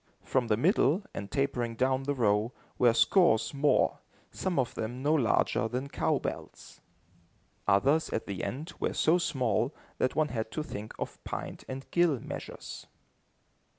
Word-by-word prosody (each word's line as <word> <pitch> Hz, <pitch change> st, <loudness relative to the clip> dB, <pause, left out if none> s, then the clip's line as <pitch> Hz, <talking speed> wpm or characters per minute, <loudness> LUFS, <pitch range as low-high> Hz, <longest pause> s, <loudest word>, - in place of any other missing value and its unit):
From 130 Hz, -3 st, 0 dB
the 105 Hz, -2 st, +2 dB
middle, 165 Hz, -, +3 dB
and 100 Hz, -, -5 dB
tapering 125 Hz, -4 st, -1 dB
down 130 Hz, +2 st, +1 dB
the 145 Hz, 0 st, 0 dB
row, 110 Hz, 0 st, +2 dB, 0.3 s
were 120 Hz, -1 st, +6 dB
scores 115 Hz, -, +4 dB
more, 145 Hz, +1 st, +2 dB, 0.3 s
some 185 Hz, -4 st, -2 dB
of 130 Hz, -3 st, +1 dB
them 120 Hz, +4 st, -4 dB
no 150 Hz, +2 st, +3 dB
larger 115 Hz, -5 st, +2 dB
than 125 Hz, +4 st, -3 dB
cow -, -, +1 dB
bells. -, -, -7 dB, 0.9 s
Others, 140 Hz, +11 st, +3 dB
at -, -, -2 dB
the 100 Hz, -3 st, -4 dB
end, 150 Hz, +6 st, -4 dB
were -, -, 0 dB
so 165 Hz, +3 st, +4 dB
small, 125 Hz, -, 0 dB, 0.2 s
that 130 Hz, -, +1 dB
one 155 Hz, -1 st, +2 dB
had 110 Hz, -2 st, -3 dB
to 155 Hz, -, -2 dB
think 110 Hz, -6 st, -7 dB
of -, -, -6 dB
pint -, -, -6 dB
and 135 Hz, +1 st, -6 dB
gill 170 Hz, -6 st, +3 dB
measures. -, -, -8 dB
130 Hz, 155 wpm, -30 LUFS, 115-150 Hz, 0.9 s, were